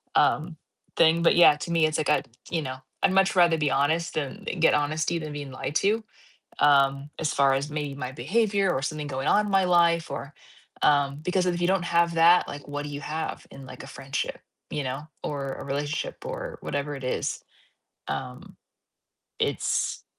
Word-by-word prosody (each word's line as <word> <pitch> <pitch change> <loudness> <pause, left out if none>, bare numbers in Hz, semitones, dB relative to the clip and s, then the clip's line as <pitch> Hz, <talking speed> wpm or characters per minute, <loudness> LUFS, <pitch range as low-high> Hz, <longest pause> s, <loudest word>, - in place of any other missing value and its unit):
um, 160 +1 +2 0.4
thing, 165 0 +4
but, 170 - +4
yeah, 175 -3 +7
to 150 - -7
me, 165 -2 +3
it's, 155 0 0
like, 155 - -1
I'd 150 - +2 0.2
you 165 -1 -1
know, 130 -1 -5 0.3
I'd - - +4
much 195 0 +3
rather 175 -2 +5
be 150 -2 +1
honest 155 +5 0
and 140 -3 -4
get 165 - +5
honesty 155 +3 0
than 155 -2 -6
being 145 -2 -6
lied 135 +2 -5
to, 215 +5 +2 0.6
um, 140 0 +3
as 155 - -1
far 135 -1 +3
as 140 +3 -3
maybe 145 -2 -3
my 130 -2 -5
behavior, 200 +4 +1
or 135 -5 -2
something 150 0 -3
going 135 -1 -3
on 210 0 +4
in 205 - -4
my 195 -1 +4
life, 170 -2 +3
or, 140 +1 -6 0.5
um 140 -1 +3
because 180 +2 0
if 175 -1 0
you 175 - +2
don't 190 -1 +2
have 170 0 +3
that, 170 +2 +5
like, 145 0 -8
what 145 0 -4
do 145 - -6
you 145 0 -6
have 160 +2 -5
in, 135 -1 -11
like, 130 - -10
a 135 - -10
friendship, 135 0 -4 0.3
you 145 - -3
know, 135 +4 -5 0.2
or 140 -2 -3
a - - -8
relationship, 145 - -3
or - - -6
whatever 145 +1 -3
it 135 - -9
is? 125 - -2 0.6
Um, - - -6 0.9
it's - - -1
150 Hz, 195 wpm, -26 LUFS, 140-170 Hz, 0.9 s, yeah